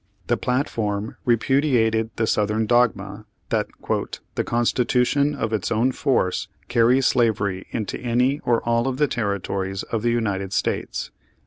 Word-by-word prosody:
The 120 - +2
platform 110 -4 -2
repudiated 120 -2 +2
the 115 - +1
Southern 110 +1 +1
dogma 110 -3 +1 0.2
that - - 0 0.7
"the - - -1
Constitution, 125 +4 +1
of 115 -5 -2
its 105 - -1
own 115 +3 +2
force, 125 -9 0 0.2
carries 125 +3 +3
slavery 100 -6 +1
into 110 -4 -4
any 125 +4 +1
or 120 -6 +1
all 115 +1 +1
of 130 -1 -2
the 150 0 +3
territories 100 -4 -2
of 115 - -3
the 120 - +1
United 100 -5 -1
States." - - -2
115 Hz, 135 wpm, -23 LUFS, 105-125 Hz, 0.7 s, carries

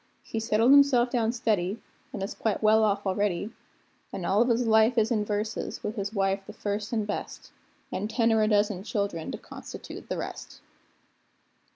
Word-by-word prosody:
He 225 - -4
settled 225 +2 +3
himself 275 -4 +5
down 230 -3 +1
steady, 215 -4 -1 0.3
an' 195 - -5
is 195 - -4
quite 220 -1 -2
well 220 +1 +5
off 205 -1 +1
already; 200 +1 -1 0.6
An' 180 - -5
all 200 +5 +3
of 240 - +3
his 235 +1 +2
life 220 +2 +4
is 225 +1 +3
verses, 210 0 -2
with 210 - -3
his 200 -2 -3
wife 195 -2 0
the 210 - -8
first 205 0 -3
an' 220 -3 0
best, 205 - -6 0.4
An' 205 - -2
ten 225 0 +2
or 220 - +3
a 215 - +3
dozen 205 -3 +2
childr'n 200 -5 -3
to - - -5
constitute - - -10
the - - -2
rest. - - -7
215 Hz, 180 wpm, -27 LUFS, 200-225 Hz, 0.6 s, himself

